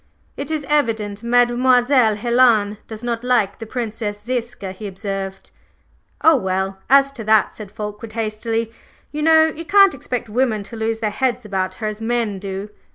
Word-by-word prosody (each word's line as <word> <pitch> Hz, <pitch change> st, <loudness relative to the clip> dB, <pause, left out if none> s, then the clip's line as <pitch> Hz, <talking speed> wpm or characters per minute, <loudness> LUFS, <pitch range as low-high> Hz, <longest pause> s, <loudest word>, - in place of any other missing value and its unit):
"It -, -, -5 dB
is 310 Hz, -2 st, -2 dB
evident 220 Hz, -8 st, 0 dB
Mademoiselle 245 Hz, 0 st, +3 dB
Helen 225 Hz, -2 st, +3 dB
does 220 Hz, +1 st, -8 dB
not 235 Hz, -1 st, -2 dB
like 240 Hz, -6 st, +1 dB
the 225 Hz, -, -7 dB
Princess 220 Hz, -3 st, -4 dB
Ziska," 240 Hz, -5 st, -4 dB
he 205 Hz, +3 st, -7 dB
observed. 195 Hz, 0 st, -5 dB, 0.7 s
"Oh, 320 Hz, -2 st, +6 dB
well, 190 Hz, -2 st, -2 dB
as 275 Hz, +1 st, +5 dB
to 260 Hz, -5 st, -7 dB
that," 220 Hz, 0 st, +3 dB
said 210 Hz, -3 st, -9 dB
Fulkeward 210 Hz, +1 st, -7 dB
hastily, 225 Hz, +1 st, -2 dB, 0.4 s
"you 300 Hz, -, -4 dB
know 320 Hz, 0 st, +6 dB
you 320 Hz, +1 st, -4 dB
can't 395 Hz, +2 st, +5 dB
expect 250 Hz, -3 st, -4 dB
women 220 Hz, -2 st, 0 dB
to 230 Hz, -, -10 dB
lose 225 Hz, 0 st, -2 dB
their 215 Hz, -2 st, 0 dB
heads 250 Hz, +1 st, -1 dB
about 190 Hz, -2 st, -2 dB
her 220 Hz, -, -6 dB
as 215 Hz, 0 st, -4 dB
men 225 Hz, -3 st, -1 dB
do. 195 Hz, +1 st, -5 dB
225 Hz, 165 wpm, -20 LUFS, 210-250 Hz, 0.7 s, Oh